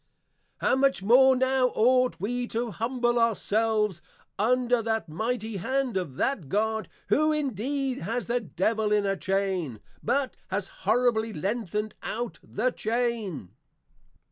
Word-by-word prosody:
_ -, -, -46 dB, 0.6 s
How -, -, +4 dB
much 270 Hz, -6 st, +2 dB
more 260 Hz, +5 st, +6 dB
now 260 Hz, 0 st, +3 dB
ought 255 Hz, +1 st, +3 dB
we 245 Hz, +6 st, -2 dB
to 235 Hz, 0 st, -2 dB
humble 240 Hz, +2 st, 0 dB
our 230 Hz, -1 st, +3 dB
selves 210 Hz, -4 st, 0 dB, 0.4 s
under 245 Hz, +2 st, +2 dB
that 220 Hz, -4 st, -1 dB
Mighty 220 Hz, +6 st, -3 dB
Hand 260 Hz, +4 st, -1 dB
of 175 Hz, -9 st, -2 dB
that 185 Hz, -, -1 dB
God 220 Hz, +1 st, 0 dB, 0.2 s
who 310 Hz, +1 st, +3 dB
indeed 270 Hz, -1 st, -1 dB
has 230 Hz, +7 st, -3 dB
the 240 Hz, +1 st, 0 dB
Devil 215 Hz, +1 st, -1 dB
in 210 Hz, -1 st, +3 dB
a 195 Hz, 0 st, +1 dB
Chain, 190 Hz, -, -1 dB, 0.2 s
but 275 Hz, -2 st, 0 dB
has 195 Hz, 0 st, -2 dB, 0.2 s
horribly 230 Hz, -2 st, +2 dB
lengthened 210 Hz, +3 st, -2 dB
out 240 Hz, +1 st, -4 dB
the 250 Hz, +4 st, -1 dB
Chain! 225 Hz, -, -2 dB
225 Hz, 140 wpm, -27 LUFS, 205-250 Hz, 0.6 s, more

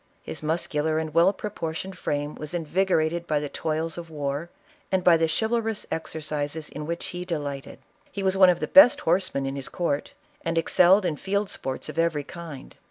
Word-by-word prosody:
His -, -, -7 dB
muscular 155 Hz, -1 st, 0 dB
and 160 Hz, -1 st, -3 dB
well 170 Hz, +4 st, +5 dB
proportioned 190 Hz, -3 st, -5 dB
frame 145 Hz, 0 st, -2 dB
was 150 Hz, +3 st, -6 dB
invigorated 170 Hz, 0 st, 0 dB
by 150 Hz, -1 st, +1 dB
the 145 Hz, -1 st, -4 dB
toils 160 Hz, +2 st, -2 dB
of 170 Hz, -1 st, -9 dB
war, 145 Hz, +1 st, -3 dB, 0.4 s
and 190 Hz, -1 st, +1 dB
by 175 Hz, -2 st, +7 dB
the 165 Hz, 0 st, +2 dB
chivalrous 225 Hz, -1 st, -1 dB
exercises 155 Hz, -1 st, -3 dB
in 150 Hz, +1 st, -7 dB
which 170 Hz, +1 st, -3 dB
he 180 Hz, 0 st, -5 dB
delighted. 145 Hz, -6 st, -4 dB, 0.3 s
He 200 Hz, -, -4 dB
was 190 Hz, 0 st, +2 dB
one 190 Hz, -1 st, +7 dB
of 175 Hz, -, +2 dB
the -, -, -1 dB
best 285 Hz, -4 st, +8 dB
horsemen 170 Hz, -5 st, +1 dB
in 135 Hz, 0 st, -3 dB
his 135 Hz, -1 st, -4 dB
court, 150 Hz, -5 st, -2 dB, 0.3 s
and 165 Hz, 0 st, -1 dB
^excelled 185 Hz, +4 st, +5 dB
in 160 Hz, -4 st, -1 dB
field 200 Hz, +3 st, -1 dB
sports 130 Hz, -1 st, -4 dB
of -, -, -5 dB
every 165 Hz, -3 st, +1 dB
kind. 160 Hz, -3 st, -9 dB
165 Hz, 185 wpm, -26 LUFS, 150-180 Hz, 0.4 s, best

